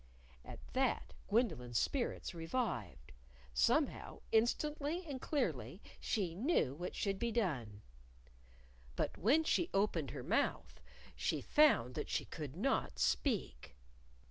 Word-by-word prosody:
At - - -9
that 260 -1 0
Gwendolyn's 165 - +1
spirits 255 - -1
revived. 165 - -3 0.4
Somehow, 60 -1 +1
instantly 300 +8 +1
and 275 -5 -5
clearly, 295 -3 -1 0.2
she 190 -7 -1
knew 205 - +1
what 175 +5 -5
should 195 -2 -1
be 235 0 0
done! 130 - -1 1.1
But - - -1
when 280 - +4
she 340 +2 +1
opened 180 -8 +1
her 125 - -6
mouth, 230 - 0 0.3
she - - 0
found 280 - +4
that 150 - -4
she - - -1
could 150 -3 -6
not 250 +10 0
speak. 200 - 0
210 Hz, 115 wpm, -36 LUFS, -, 1.1 s, when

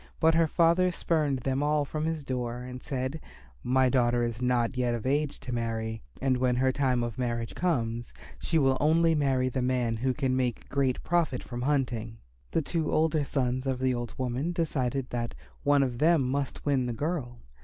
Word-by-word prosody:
But 160 0 +4
her 165 0 +4
father 170 +3 +3
spurned 150 -6 0
them 135 +2 0
all 150 0 +2
from 155 +2 -3
his 160 -2 -2
door 125 -2 -3
and 125 0 -7
said, 135 +3 -3 0.4
"My 130 +1 +3
daughter 120 -2 +2
is 120 0 -3
not 125 0 +1
yet 125 -2 +1
of 115 - -6
age 145 +2 0
to 125 - -5
marry; 110 -1 -2 0.2
and 130 -1 +1
when 125 -1 +2
her 130 +1 +2
time 130 -3 +1
of 120 0 -4
marriage 120 -2 -2
comes, 120 -9 -1 0.3
she 165 - 0
will 135 -3 +3
only 165 +2 +4
marry 135 -4 +2
the 130 0 -1
man 125 -2 0
who 130 +2 0
can 130 -3 0
make 125 -3 -1
great 135 -2 0
profit 165 -7 0
from 120 -1 -6
hunting." 125 -5 -1 0.3
The 160 - 0
two 160 0 -1
older 155 -1 +2
sons 130 -2 -1
of 130 -1 0
the 130 0 +1
old 120 -2 -4
woman 130 +6 -1
decided 135 -6 -1
that 120 -1 -3 0.3
one 145 -1 +4
of 125 -3 -3
them 160 -2 +4
must 135 +2 -2
win 135 -4 +2
the 120 - -2
girl. 140 -3 -3
130 Hz, 195 wpm, -28 LUFS, 120-150 Hz, 0.4 s, But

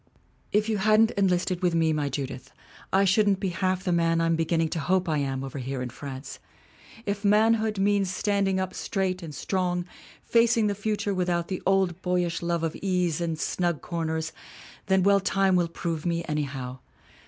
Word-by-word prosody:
' - - -37
'If 210 +1 +2
you 215 -2 0
hadn't 215 +2 +4
enlisted 185 -2 +1
with 175 -2 +1
me, 160 -1 +3
my 150 -2 -1
Judith, 135 -2 -5 0.4
I 195 +1 +4
shouldn't 195 0 +3
be 195 - -1
half 185 0 -1
the 180 - 0
man 165 -1 +2
I'm 165 0 +2
beginning 165 0 +1
to 165 - -2
hope 185 +5 +1
I 155 -2 +1
am, 135 -1 -2
over 135 +1 -6
here 130 +1 -4
in 125 -1 -4
France. 135 +1 -8 0.7
If 200 0 -2
manhood 215 +1 +3
means 200 -1 +2
standing 195 0 0
up 185 -1 -2
straight 190 -2 -2
and 155 -4 -8
strong, 180 +1 -1 0.4
facing 230 -1 +3
the 205 - +1
future 205 0 -2
without 175 -2 -1
the 185 - -3
old 190 -2 +2
boyish 180 -2 0
love 170 -1 -1
of 165 - -1
ease 180 -4 0
and 165 -2 -1
snug 170 -1 -1
corners 160 -2 -2 0.6
then 190 -1 +3
well 200 +1 +5
time 195 -1 +2
will 175 -1 +2
prove 165 -1 -4
me, 170 -1 -1
anyhow. 135 -4 -3
180 Hz, 185 wpm, -26 LUFS, 160-195 Hz, 0.7 s, well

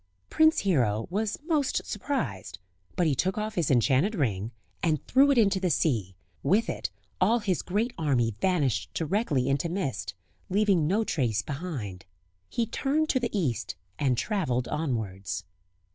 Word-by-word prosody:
Prince 315 0 +4
Hero 120 - +1
was 210 +2 -1
most 305 -5 0
surprised; 110 - -3 0.4
but 180 - +2
he 155 - +3
took 185 +9 0
off 215 0 -2
his 170 -5 0
enchanted 135 - +3
ring 110 - -1 0.3
and 155 -4 0
threw 275 +2 +5
it 280 - +3
into 200 -4 +4
the 185 -1 0
sea; 115 - 0 0.3
with 210 +10 +2
it 95 - -4 0.3
all 220 +6 +4
his 195 -6 0
great 220 +6 -1
army 130 -7 +2
vanished 140 - +1
directly 160 - 0
into 140 +4 0
mist, 170 - -3 0.3
leaving 195 -5 +3
no 205 +6 +2
trace 115 - 0
behind. 130 - -5 0.4
He 235 - 0
turned 290 +7 0
to 260 - +3
the 240 -1 -1
East 120 - -1 0.2
and 130 -4 +2
travelled 125 - 0
onwards. 110 -11 -3
165 Hz, 150 wpm, -28 LUFS, -, 0.4 s, threw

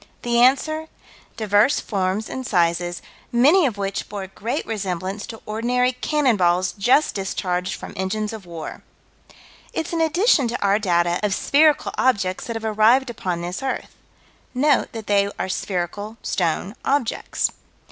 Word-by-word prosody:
The 235 0 +1
answer: 310 +5 +3 0.2
"... - - -26
divers 215 +4 +3
forms 195 +1 -1
and 260 - -5
sizes, 175 -4 0 0.3
many 290 +8 +5
of 220 -5 -4
which 195 -1 -3
bore 200 -2 -5
great 230 +8 -4
resemblance 195 -1 -3
to 225 - -10
ordinary 245 +4 +1
cannon 265 -2 +1
balls 180 0 +2
just 240 +11 +2
discharged 185 -2 -2
from - - -9
engines 210 +3 -2
of 210 -5 -9
war." 165 -2 -7 0.9
It's 325 - -3
an 330 - 0
addition 325 - +3
to 235 +2 -3
our 200 +1 +2
data 175 -3 +1
of 205 -2 +1
spherical 300 +1 +3
objects 200 -8 +1
that 230 - -4
have 225 0 -4
arrived 225 +4 +3
upon 180 -6 -3
this 175 +6 -4
earth. 270 -1 -3 0.6
Note 290 +3 +2
that 225 -2 -6
they 200 -1 +2
are - - -2
spherical 195 +3 -3
stone 180 +3 -1
objects. 275 -4 0
215 Hz, 150 wpm, -22 LUFS, 185-250 Hz, 0.9 s, many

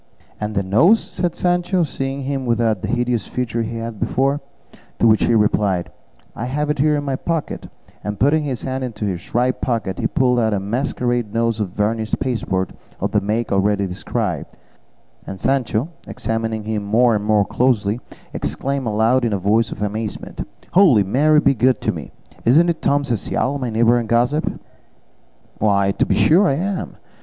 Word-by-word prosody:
"And 105 0 -3
the 100 - +1
nose?" 145 - +5
said 175 -2 -3
Sancho, 180 0 +1
seeing 135 -2 -3
him 135 -1 -3
without 115 -4 +1
the - - -3
hideous 120 -3 0
feature 120 -2 -2
he 115 +1 -4
had 115 -2 -6
before; 140 +2 0 0.6
to - - +2
which 110 -1 +5
he 115 - +3
replied, 105 -4 +1 0.4
"I 115 - -4
have 150 +4 -1
it 150 - -3
here 150 +1 +3
in 145 - -1
my 135 -2 -1
pocket," 165 +3 -3 0.3
and 105 0 -4
putting 145 +4 +3
his 130 -6 -3
hand 130 0 -3
into 115 -4 -4
his 95 +1 -5
right 125 +1 +1
pocket, 110 -6 -2
he - - +1
pulled 125 -2 +2
out 110 -2 +1
a - - 0
masquerade 120 +1 -2
nose 115 -1 +1
of 105 -3 -1
varnished 110 +3 -1
pasteboard 100 -7 -1 0.3
of - - -1
the - - +2
make 110 +3 -1
already 100 +1 +2
described; 90 -1 -3 0.7
and 95 - -6
Sancho, 130 - 0 0.2
examining 115 -1 -3
him 105 -1 -2
more 115 +4 +3
and 105 -1 0
more 105 -1 +3
closely, 115 -3 +1 0.3
exclaimed 135 -2 -2
aloud 110 +4 +2
in 115 -3 +1
a - - +1
voice 105 +4 +1
of 105 - -4
amazement, 105 +1 -4 0.2
"Holy 165 - +6
Mary 150 +10 +3
be 145 - +3
good 125 +1 +2
to - - +1
me! - - -7 0.3
Isn't 160 +9 +5
it 170 - -2
Tom 145 0 +2
Cecial, 130 +2 -1
my 125 -2 -2
neighbour 115 +2 +3
and 115 -2 -5
gossip?" 125 +6 +2 1.1
"Why, 100 -2 +2
to - - 0
be - - +2
sure 185 +6 +5
I 135 - +2
am!" 185 +4 -3
115 Hz, 180 wpm, -20 LUFS, 105-135 Hz, 1.1 s, Holy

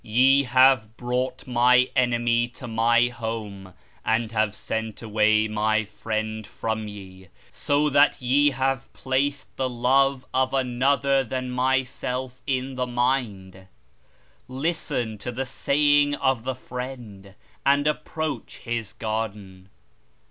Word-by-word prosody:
Ye 135 +5 +4
have 125 -3 +4
brought 125 +1 -2
My 125 0 +4
enemy 120 -2 +2
to 130 - -8
My 115 +1 +3
home 110 -5 -6 0.3
and 110 0 0
have 110 -2 0
sent 110 0 -4
away 110 0 +2
My 110 0 +1
Friend 110 0 -4
from 110 -1 -4
ye; 95 -2 -11 0.2
so 145 +1 +1
that 145 +2 +4
ye 140 +4 +3
have 135 -1 -2
placed 135 +1 -2
the 130 -1 0
love 130 +2 +2
of 130 +1 +1
another 135 +2 +2
than 130 +1 -4
Myself 130 0 -1
in 130 -1 -1
the 125 0 -1
mind. 115 -7 -2 0.8
Listen 130 -5 -2
to 120 - -5
the 130 +3 -3
Saying 145 +2 +2
of 130 -4 0
the 130 -1 -2
Friend, 120 -7 -8 0.3
and 140 +1 +3
approach 150 -3 -3
His 115 -3 -4
Garden. 105 -4 -5
125 Hz, 120 wpm, -24 LUFS, 110-130 Hz, 0.8 s, Ye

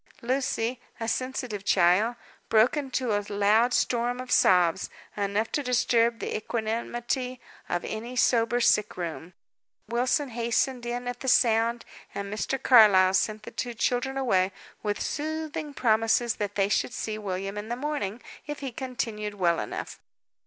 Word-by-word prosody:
Lucy, 250 -1 -1 0.2
a 225 - -3
sensitive 250 -4 -3
child, 195 +5 +3 0.3
broke 220 +5 +4
into 260 -6 -1
a 205 - +1
loud 210 +4 +3
storm 245 0 0
of 255 0 -7
sobs, 180 -1 +4 0.3
enough 205 +2 -1
to 290 - 0
disturb 235 -2 +2
the - - -4
equanimity 240 +3 -3 0.3
of 175 - -1
any 235 +3 -5
sober 240 -1 +3
sick 210 -4 +2
room. 170 0 -5 0.5
Wilson 250 +5 0
hastened 240 +1 -1
in 245 +1 -3
at 245 0 -4
the 265 - -6
sound, 230 -1 +3 0.3
and 200 0 -4
Mr. 215 +5 -1
Carlyle 205 -8 +6
sent 210 +3 0
the - - -9
two 240 -2 -4
children 250 +3 0
away, 195 -8 +2 0.3
with 205 -1 -2
soothing 310 0 -3
promises 225 -2 +2
that 205 -1 -3
they 195 -1 +2
should 225 +4 0
see 215 -1 -3
William 195 0 -4
in 210 +1 -6
the 240 - -1
morning, 255 -6 -3 0.2
if 295 -1 -5
he 270 -2 -4
continued 225 -5 -4
well 175 -4 +2
enough. - - -5
230 Hz, 150 wpm, -27 LUFS, 210-250 Hz, 0.5 s, Carlyle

